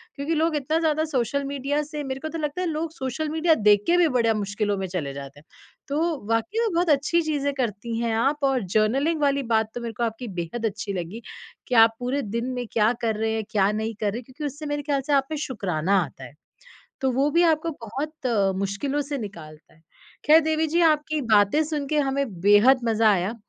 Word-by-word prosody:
क्योंकि 285 +3 -2
लोग 320 0 +1
इतना 300 +3 0
ज़्यादा 315 -1 +1
सोशल 280 -1 -1
मीडिया 280 +1 -1
से 300 0 -6
मेरे 265 -1 -4
को 315 - -5
तो 330 - -5
लगता 300 +3 -3
है 360 - -1
लोग 315 0 -3
सोशल 270 +2 -3
मीडिया 320 +1 +3
देख 205 -3 +4
के 345 - +4
भी 350 -2 +5
बड़े 235 -3 +2
मुश्किलों 205 0 -1
में 190 - -3
चले 160 -7 -4
जाते 140 0 -9
हैं। 155 - -22 0.4
तो 285 +2 -1 0.3
वाक़ई 230 - 0
में 455 -2 +1
बहुत 345 0 +1
अच्छी 300 +4 +3
चीज़ें 290 -3 -1
करती 230 -3 -3
हैं 230 -1 0
आप 275 +6 +1
और 270 -4 +2
जर्नलिंग 270 +9 +2
वाली 280 -1 +2
बात 220 0 +2
तो 245 - -4
मेरे 230 -1 -5
को 240 - -1
आपकी 230 +2 -3
बेहद 225 +8 -4
अच्छी 200 -1 -3
लगी 185 +5 -5 0.5
कि 250 - -1
आप 225 0 +6
पूरे 255 +3 -1
दिन 235 +1 -3
में 245 -1 -3
क्या 215 0 +3
कर 225 -2 0
रहे 220 0 0
हैं, 220 0 -2
क्या 200 -1 +3
नहीं 220 +1 -2
कर 205 - +1
रहे 225 - -5
हैं, 250 - -11
क्योंकि 260 +4 -10
उससे 290 +2 -5
मेरे 290 0 -2
ख्याल 280 -2 0
से 295 - +1
आप 275 -1 +3
में 310 - -2
शुकराना 195 - 0
आता 135 -3 -11
है, 130 - -11 0.7
तो 265 - +1
वो 275 +4 +2
भी 335 +4 +3
आपको 320 +2 -4 0.2
बहुत 280 +5 -5 0.3
मुश्किलों 200 +9 -2
से 285 0 -4
निकालता 160 -8 -10
है। 160 - -25 0.5
ख़ैर 315 +2 +7
देवी 315 0 0
जी 335 +3 +1
आपकी 305 0 -2
बातें 205 +10 +4
सुन 300 -2 -3
के 305 - +1
हमें 275 -1 +1 0.2
बेहद 210 +6 +6
मज़ा 225 -1 +3
आया। 190 +4 -1
260 Hz, 225 wpm, -24 LUFS, 215-300 Hz, 0.7 s, ख़ैर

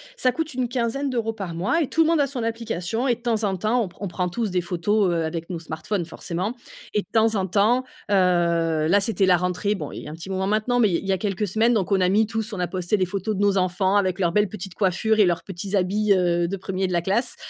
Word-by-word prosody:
Ça 255 - +2
coûte 315 +2 -4
une 250 -1 -1
quinzaine 255 +3 -1
d'euros 225 -3 -1
par 195 -6 -6
mois 200 - 0
et 285 - 0
tout 325 - +2
le 320 - +4
monde 330 -3 +3
a 280 - +2
son 250 -4 -4
application 230 +1 -2
et 240 - +3
de 235 - -23
temps 225 -3 0
en 190 -2 0
temps, 220 +6 +1
on - - -4
pr 175 - -22
on 200 - -2
prend 180 0 -2
tous 215 +1 -2
des 180 -1 +1
photos, 185 +3 +1
heu, 165 -1 0
avec 165 +2 -5
nos 170 -2 -4
smartphones, 165 +3 -3
forcément 180 +7 -4 0.4
et 210 - +2
de - - -18
temps 225 0 +3
en 190 -1 0
temps, 220 +7 +3 0.3
heu 170 -4 +2
là, 200 +3 +5
c'était 200 -2 +1
la 180 -1 +5
rentrée, 180 +4 -1
bon, - - -6
il - - -8
y - - -9
a - - -6
un - - -7
petit 165 +4 -9
moment 190 0 -1
maintenant, 220 +4 +1
mais 215 -4 +4
il 185 +3 -2
il - - +4
y - - +4
a - - +1
quelques 205 +1 -2
semaines, 225 +5 +2
donc, 205 -2 0
on 190 -1 +3
a 180 - +3
mis 210 +2 +3
tous 220 -1 -3
on 185 - -4
a 180 - 0
posté 180 +3 -1
des 185 - +1
photos 200 +3 -2
de 200 - -2
nos 200 -1 +3
enfants 185 +2 +1
avec 185 -2 +1
leurs 170 -2 +2
belles 210 +2 +2
petites 190 -2 -7
coiffures 210 +3 +1
et 205 - +7
leurs 175 -1 0
petits 195 +2 -5
habits, 200 +2 +2
heu, 175 -2 +2
de 195 - -3
1er 190 0 -2
de 180 - -3
la 170 - +2
classe. 200 +8 0
195 Hz, 290 wpm, -23 LUFS, 180-220 Hz, 0.4 s, et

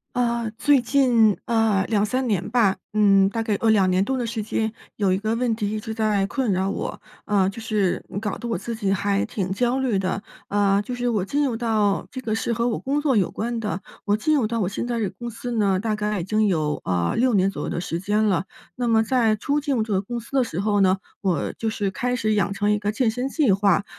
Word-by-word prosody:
呃， 235 -2 0
最 285 -1 +4
近 235 -4 +3
呃， 225 -4 +2
2-3 225 +4 0
年 205 -2 -1
吧， 220 -4 +3 0.2
嗯， 200 -2 +4
大 225 +3 -2
概 215 -2 0
呃， 225 - +3
2 200 -4 +4
年 185 +1 +2
多 265 +5 -1
的 245 -2 -2
时 225 -1 -3
间 220 +1 -1 0.2
有 195 -3 +2
一 - - +1
个 215 +3 -1
问 240 -2 +1
题 210 -2 -2
一 215 - -2
直 220 +1 -5
在 215 -3 +1
困 255 -1 -1
扰 190 +1 0
我， - - -4 0.2
呃， 195 -2 +2
就 215 +4 -8
是 210 -4 0
嗯 200 - -4
搞 210 -2 -3
得 240 - -6
我 230 - 0
自 235 - -5
己 200 -3 -1
还 200 0 +1
挺 190 -2 -3
焦 245 +5 +1
虑 255 -6 +1
的。 190 +1 -1 0.3
呃， 200 -1 +2
就 250 - -6
是 245 0 -2
我 215 -6 +1
进 285 +9 0
入 250 -4 -1
到 220 -4 +1
这 260 - -6
个 225 -4 -2
是 230 - -2
和 235 +1 0
我 235 - 0
工 280 +2 -1
作 290 -3 +1
有 195 -5 +2
关 235 +2 -3
的， 205 -4 -3 0.2
我 205 +1 +1
进 305 +8 +2
入 265 -6 +2
到 230 +1 -2
我 195 - +1
现 200 +5 -3
在 240 -1 -2
这 220 - 0
个 190 - -5
公 240 0 -5
司 240 +2 -6
呢， 200 -4 +2
大 215 +1 -1
概 210 -1 -1
已 170 - -4
经 215 +2 +1
有 155 -6 0
呃， 90 -2 0
6 250 +1 +2
年 195 -1 +3
左 195 - -5
右 - - -3
的 - - -2
时 170 -1 -3
间 210 +4 +1
了。 190 -5 +2 0.3
那 245 -1 -1
么 225 -1 +4
在 225 -2 +2
初 290 +6 0
进 285 -1 -1
入 235 - +1
这 215 -1 -2
个 190 - +2
公 235 +4 -5
司 235 - -14
的 270 -2 +3
时 185 -7 -5
候 205 0 +2
呢， 190 0 +4 0.2
我 185 -4 -1
就 225 - -1
是 205 -2 -1
开 245 +6 -2
始 215 -2 +1
养 205 -1 +1
成 205 +1 0
一 210 - +2
个 205 0 -1
健 225 +2 +1
身 250 +4 -2
计 275 - +3
划， 200 0 +2
215 Hz, 275 characters per minute, -23 LUFS, 200-235 Hz, 0.3 s, 最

